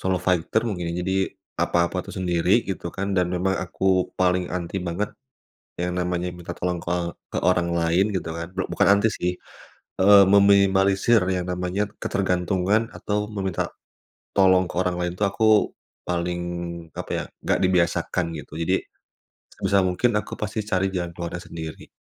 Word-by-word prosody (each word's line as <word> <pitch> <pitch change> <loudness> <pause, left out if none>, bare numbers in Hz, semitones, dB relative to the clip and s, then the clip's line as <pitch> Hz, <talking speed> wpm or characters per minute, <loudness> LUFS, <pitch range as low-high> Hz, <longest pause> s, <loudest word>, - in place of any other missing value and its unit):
solo 95 0 +1
fighter 90 +5 +1
mungkin 90 -7 -3
ya 85 - -3
jadi, 95 +1 0 0.4
apa-apa 85 +1 +1
itu - - -10
sendiri 90 +4 +2
gitu 95 -3 -4
kan 100 +3 -3
dan 90 -2 +2
memang 90 +2 0
aku 90 +1 -5 0.3
paling 90 -1 +2
anti 90 +2 -3
banget 90 +4 -3 0.7
yang 90 0 -2
namanya 90 0 -1
minta 90 -1 -7
tolong 90 0 -2
ke 85 0 -5 0.4
ke - - -1
orang 90 -1 +2
lain 85 +5 +2
gitu 85 -4 -3
kan 85 - -3
blok 95 0 -3
bukan - - +2
anti 100 +2 +3
sih, 90 -3 -1 0.7
eee, 100 +1 +8
meminimalisir 100 +2 +5
yang 90 -1 -1
namanya 90 +2 -1 0.2
ketergantungan 95 +3 +1
atau 105 0 -2
meminta 100 -3 -3 0.6
tolong 95 -2 +4
ke - - -9
orang 90 -1 +1
lain 90 0 -2
tuh 105 - +2
aku 100 +3 -1 0.6
paling 85 0 -1 0.5
apa - - -6
ya, - - -3 0.2
nggak - - +1
dibiasakan 90 -1 +1
gitu 75 - -10
jadi, 95 +3 +2 0.7
sebisa 95 0 +1
mungkin 95 +6 +1
aku 105 - -2
pasti 105 +1 -2
cari 95 -2 0
jalan 85 -2 -2
keluarnya 85 0 -6
sendiri. 80 -2 -8
90 Hz, 160 wpm, -24 LUFS, 90-100 Hz, 0.7 s, eee